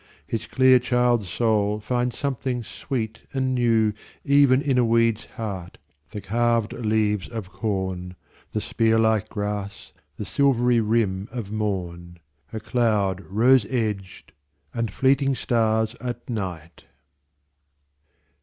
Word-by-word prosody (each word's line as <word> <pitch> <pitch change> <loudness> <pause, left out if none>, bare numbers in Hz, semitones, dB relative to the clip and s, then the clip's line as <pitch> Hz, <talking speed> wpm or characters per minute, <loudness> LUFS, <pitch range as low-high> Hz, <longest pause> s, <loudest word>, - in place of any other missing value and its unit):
His 115 - -4
clear 130 -1 +5
child's 125 -4 +1
soul 105 0 +1
finds 120 +3 -1
something 130 -3 -2
sweet 115 -1 -5
and 130 -1 0
newEven 120 +4 +2
in 135 -3 +1
a - - +4
weed's 115 -1 +2
heart, 95 -5 -5 0.3
the 105 - -6
carved 115 0 +1
leaves 105 -3 0
of 110 -5 -7
corn, 95 -4 -3 0.4
The - - -1
spear 115 0 +1
like 110 -1 +2
grass, 100 -1 -5 0.2
the - - -5
silvery 125 -4 +2
rim 105 -3 0
of 115 -5 -6
morn,A 85 -4 -5
cloud 105 -5 +1
rose 120 +3 +4
edged, 105 -6 -3 0.4
and 115 -3 -2
fleeting 135 +3 +2
stars 110 -2 +1
at 120 -1 -5
night! 90 - -6
110 Hz, 115 wpm, -24 LUFS, 100-120 Hz, 0.4 s, clear